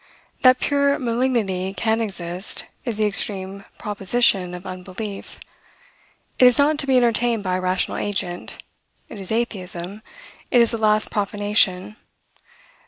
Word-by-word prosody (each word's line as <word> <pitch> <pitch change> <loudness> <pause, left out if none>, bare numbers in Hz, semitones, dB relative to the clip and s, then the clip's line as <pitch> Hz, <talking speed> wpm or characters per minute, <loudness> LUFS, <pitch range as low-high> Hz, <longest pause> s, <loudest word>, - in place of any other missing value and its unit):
That 255 0 +6
pure 280 0 +2
malignity 230 -7 -1
can 225 0 +1
exist, 185 -3 -2 0.2
is 235 -4 -3
the 215 - +2
extreme 195 -1 -2
proposition 200 -3 +1
of 180 +2 -10
unbelief. 185 +3 -7 1.0
It 255 - +7
is 250 -1 +7
not 295 +1 +3
to 275 - 0
be 260 -1 +4
entertained 235 -2 +2
by 185 -1 -1
a - - -4
rational 185 0 -1
agent; 185 -3 -4 0.5
it 215 - -9
is 190 +1 -5
atheism; 200 -4 -2 0.5
it 245 - +4
is 235 -1 +4
the 230 - -3
last 215 0 +3
profanation. 205 -1 0
210 Hz, 135 wpm, -22 LUFS, 185-235 Hz, 1.0 s, It